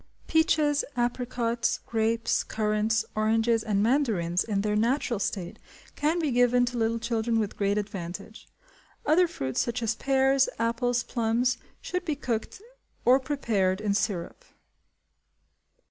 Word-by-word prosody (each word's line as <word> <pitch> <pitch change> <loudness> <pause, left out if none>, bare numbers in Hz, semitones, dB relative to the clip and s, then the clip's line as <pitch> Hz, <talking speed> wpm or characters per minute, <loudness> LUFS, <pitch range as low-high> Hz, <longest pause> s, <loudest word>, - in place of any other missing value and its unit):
Peaches, 310 -3 +2
apricots, 240 -1 -1
grapes, 225 0 0
currants, 215 0 0
oranges, 225 +1 +2
and 205 -2 +1
mandarins, 215 -9 +1
in 205 -3 -1
their 210 0 0
natural 235 +1 +1
state, 190 -3 -3 0.4
can 305 +4 +1
be 315 -5 0
given 245 0 +4
to 245 0 -4
little 225 0 +1
children 230 0 -1
with 215 -2 -1
great 200 0 0
advantage. 200 +1 -6 0.6
Other 345 +4 +4
fruits, 130 - -2
such 235 0 -2
as 230 0 +1
pears, 270 0 +2
apples, 240 +1 0
plums, 235 +2 0 0.2
should 360 0 -3
be 315 -5 -2
cooked 255 - -4 0.4
or 255 +2 +6
prepared 220 -9 0
in 210 -1 0
syrup. 195 -4 -2
230 Hz, 130 wpm, -27 LUFS, 210-255 Hz, 0.6 s, or